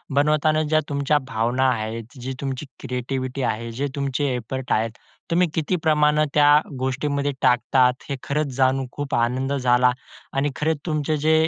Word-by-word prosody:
बनवताना 155 +2 +3
ज्या 155 - +6
तुमच्या 140 +1 +2
भावना 120 +4 +1
आहेत, 115 +2 -4
जी 130 +2 -4
तुमची 135 +1 -3
क्रिएटिव्हिटी 130 +1 -3
आहे, 115 +2 -6
जे 145 - 0
तुमचे 140 0 -1
एफर्ट 130 +3 -5
आहेत. 110 +1 +1 0.4
तुम्ही 180 +1 +3
किती 160 +3 0
प्रमाणे 150 0 +4
त्या 145 -1 +5 0.3
गोष्टींमध्ये 140 +2 -1
टाकतात 125 +1 +3
हे 140 - -1
खरंच 150 +1 -1
जाणून 135 0 +2
खूप 145 -1 -3
आनंद 130 +4 0
झाला 125 -1 +3 0.5
आणि 145 +1 +2
खरंच 155 0 0
तुमचे 155 -1 0
जे 155 +2 +2
135 Hz, 150 wpm, -23 LUFS, 125-150 Hz, 0.5 s, ज्या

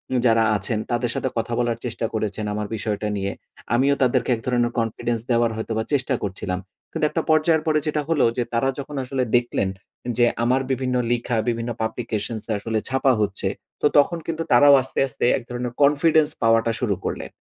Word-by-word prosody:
উ - - +3
যারা 115 -1 +4
আছেন, 105 +2 -2
তাদের 120 0 0
সাথে 130 - -1
কথা 115 +1 -2
বলার 120 -2 0
চেষ্টা 115 -1 -3
করেছেন 110 -1 -2
আমার 105 0 -3
বিষয়টা 105 0 -2
নিয়ে। 100 0 -2 0.4
আমিও 140 +3 +3
তাদেরকে 125 -1 +1
এক - - -8
ধরনের 120 -1 +1
কনফিডেন্স 115 +1 -1
দেওয়ার 115 -1 +3
হয়তো 110 - -5
বা 110 - 0
চেষ্টা 135 -1 +1
করছিলাম। 95 -2 -3 0.3
কিন্তু - - 0
একটা - - -1
পর্যায়ের 155 0 +3
পরে 155 -1 +3
যেটা 150 0 0
হলো 160 -4 +3
যে 125 - +2
তারা 120 +3 +2
যখন 145 +1 -6
আসলে 130 0 -1
দেখলেন, 120 -5 +1 0.5
যে 120 - +5 0.2
আমার 130 +3 +2
বিভিন্ন 130 -1 -1 0.2
লিখা, 120 0 0
বিভিন্ন 115 0 -2
publications 110 -1 -3
এ - - 0
আসলে 110 +1 -1
ছাপা 135 0 +3
হচ্ছে। 100 -1 -1 0.3
তো - - +1
তখন 155 +4 +4
কিন্তু 165 0 -2
তারাও 140 +4 +7
আস্তে, 130 - -4
আস্তে 125 - -2
এক 130 - -7
ধরনের 120 0 -4
Confidence 150 +2 +4
পাওয়াটা 115 0 +3
শুরু 105 -5 0
করলেন। - - -3
120 Hz, 190 wpm, -23 LUFS, 110-135 Hz, 0.5 s, তারাও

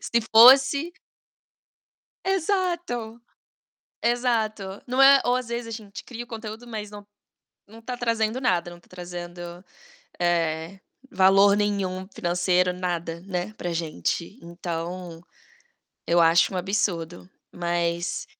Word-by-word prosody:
Se 235 - 0
fosse 270 +7 +7 1.3
Exato. 345 - -1 0.8
Exato. 220 -5 -1
Não 255 +1 -1
é 275 0 +8
ou 245 +1 +2
às 255 -2 -4
vezes 235 0 -4
a - - -7
gente 215 -3 -8
cria 240 -1 -7
o - - -23
conteúdo, 225 0 -8
mas 215 -3 -6
não 205 -1 -11 0.6
não 225 +2 -14
tá 245 +2 -6
trazendo 230 0 0
nada, 180 -9 0
não 175 - -12
tá - - -27
trazendo 175 -1 -8 0.8
eh, 170 +1 -1 0.3
valor 195 +2 +5
nenhum 195 -3 -1
financeiro, 180 +1 +1
nada, 175 -2 -4
né, 185 +2 -4
pra 175 -1 -4
gente. 165 - -3
Então 170 0 -6 0.9
eu 170 +1 +3
acho 165 +3 +4
um - - -2
absurdo. 180 -3 -2 0.2
Mas 170 0 -2
195 Hz, 120 wpm, -25 LUFS, 175-235 Hz, 1.3 s, é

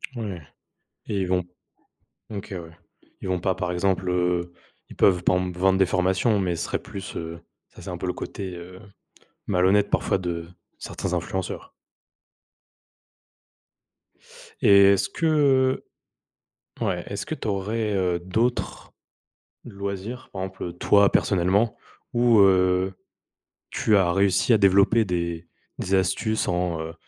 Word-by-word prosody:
Ouais 100 -8 -5 0.7
et 100 - -2
ils - - -1
vont 90 0 +1 0.9
OK, 100 -1 -6
ouais. 85 -3 -8 0.4
Ils 95 - -6
vont 90 -1 -1
pas, 95 +1 0
par 90 -2 -2
exemple, 95 0 0
heu, 90 -1 0 0.4
ils - - -12
peuvent, 90 -2 +3
par - - +3
exemple, 90 -1 -4
vendre 95 +1 +3
des 95 - +5
formations, 95 +4 +1
mais 90 -3 0
ce 85 - -3
serait - - -2
plus, 95 -1 -8
heu, 85 0 -6 0.3
ça - - -15
c'est - - -7
un - - -5
peu - - -4
le - - 0
côté, 95 -2 -6
heu, 90 +1 -10 0.7
malhonnête 95 +2 +3
parfois - - +1
de 85 -2 -4 0.3
certains - - -4
influenceurs. 95 -1 -4 2.9
Et 100 0 +7
est-ce 100 - 0
que, 140 -5 +2 1.0
heu - - +1
ouais, 90 -2 -1
est-ce 100 0 -5
que 155 - -4
tu - - -6
aurais, 105 +2 -1
heu, 90 -3 0
d'autres 110 +8 -2 0.7
loisirs, 100 +5 -6
par 95 -1 -4
exemple, 95 -2 -6
toi, 100 +2 +4
personnellement, 100 +4 +2 0.4
où, 120 -2 +4
heu, 95 -1 +3 0.8
tu 105 - +1
as 90 -3 +3
réussi 100 +4 +3
à - - +6
développer 100 +3 +4
des 85 -2 -3 0.3
des 95 - -2
astuces 95 +4 +1
en, 90 -2 -1
heu, 80 +1 -6
95 Hz, 140 wpm, -24 LUFS, 90-100 Hz, 2.9 s, Et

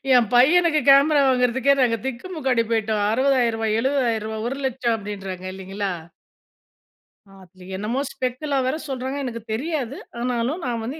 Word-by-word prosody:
என் 240 -3 +4
பையனுக்கு 310 +6 +5
கேமரா 285 +2 +6
வாங்குறதுக்கே 255 +1 +3
நாங்க 235 -2 +2
திக்குமுக்காடி 265 -2 -1
போய்ட்டோம். 220 -2 0
₹60,000 230 -4 +1
₹700,000 230 -4 -1
₹1,00,000 260 -3 -1
அப்டின்றாங்க 195 -3 -7
இல்லைங்களா? 195 +1 -4 1.5
அதுல 185 0 -17
என்னமோ 215 +6 -2
ஸ்பெக்குல்லா 270 +2 -2
வேற 260 - 0
சொல்றாங்க. 265 +1 -3
எனக்கு 230 -2 -5
தெரியாது. 275 0 -3 0.2
ஆனாலும், 250 +6 -1
நான் 235 -2 -2
வந்து 275 +7 -5
245 Hz, 120 wpm, -22 LUFS, 225-270 Hz, 1.5 s, கேமரா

